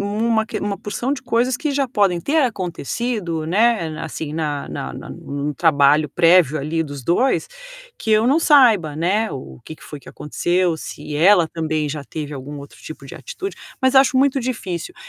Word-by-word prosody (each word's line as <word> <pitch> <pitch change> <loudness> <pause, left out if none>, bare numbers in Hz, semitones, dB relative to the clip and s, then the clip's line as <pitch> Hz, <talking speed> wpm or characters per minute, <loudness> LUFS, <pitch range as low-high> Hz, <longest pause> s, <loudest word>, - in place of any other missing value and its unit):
uma 220 +2 0
que - - -4
uma 200 -1 -3
porção 235 +4 -3
de 285 - -3
coisas 245 0 0
que 300 +3 -2
já 275 -1 0
podem 200 -7 +1
ter 295 - -1
acontecido, 185 - -3
né, 180 -3 +1
assim, 155 -2 -5
na 150 -3 -3
na - - -5
na - - -9
num 145 +1 -4
trabalho 150 0 +3
prévio 165 -1 +4
ali 155 +4 -2
dos 145 -3 -8
2, 210 - +1 0.5
que 220 - -1
eu 215 +1 +4
não 270 +6 +4
saiba, 235 - +4
né, 195 +8 0
o 130 - -8
que 160 - -8
que - - -20
foi 150 - -9
que 135 - -16
aconteceu, 175 +3 -1
se 150 -1 -7
ela 175 +1 +5
também 155 -2 -2
já 145 0 -5
teve 150 0 -6
algum 145 +1 -7
outro 140 0 -12
tipo 155 -3 -10
de 135 - -9
atitude, 390 +1 -7 0.3
mas 260 +1 +3
acho 265 -1 +5
muito 275 +1 +3
difícil. 235 - -4
175 Hz, 185 wpm, -20 LUFS, 155-235 Hz, 0.5 s, ela